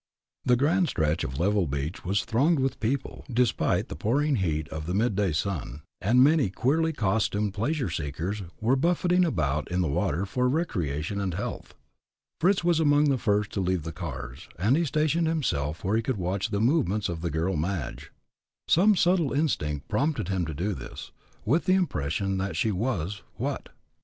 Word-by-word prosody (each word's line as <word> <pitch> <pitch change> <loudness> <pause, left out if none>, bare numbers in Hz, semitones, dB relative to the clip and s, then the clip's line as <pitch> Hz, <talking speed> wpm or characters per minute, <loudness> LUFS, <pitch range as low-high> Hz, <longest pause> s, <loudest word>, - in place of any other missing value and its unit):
The 125 - +4
grand 165 +7 +2
stretch 80 -3 0
of 65 +1 -4
level 100 0 +2
beach 70 +4 -4
was 100 +2 0
thronged 145 +9 +2
with 135 0 -1
people, 125 +5 -2
despite 125 0 +1
the - - -6
pouring 135 - +1
heat 80 -5 -1
of 80 0 -6
the 90 - -1
midday 105 -4 +1
sun, 75 -2 -3 0.2
and 120 +6 +5
many 145 -6 +4
queerly 155 - +1
costumed 105 -4 0
pleasure 130 +7 -1
seekers 80 +5 -3 0.2
were 120 +5 +2
buffeting 175 +4 +2
about 75 - 0
in 90 +1 0
the 90 - +1
water 75 +5 0
for 125 +6 0
recreation 100 - -1
and 95 -4 -2
health. 100 - -5 0.6
Fritz 180 +3 +3
was 170 -2 +3
among 145 -1 +4
the 130 - 0
first 105 -1 +1
to 100 - -2
leave 90 -3 0
the 80 - -5
cars, 70 -7 -7
and 105 +10 +3
he 170 +2 +2
stationed 155 +3 +1
himself 80 - -1
where 100 +4 +1
he - - +1
could 115 0 -2
watch 95 +3 -1
the 100 -2 -1
movements 110 - +2
of 85 -2 -4
the 85 - -1
girl, 80 +4 -1
Madge. 80 -4 -3 0.6
Some 200 +5 +5
subtle 175 -5 +2
instinct 75 - -1
prompted 130 -1 0
him 95 -4 0
to 80 - -4
do 95 +7 -1
this, - - -8 0.3
with 150 +10 +2
the 185 - +4
impression 95 - -1
that 95 +1 -2
she 110 -4 +1
was 100 -2 -2
what? - - -3
105 Hz, 180 wpm, -27 LUFS, 85-140 Hz, 0.6 s, and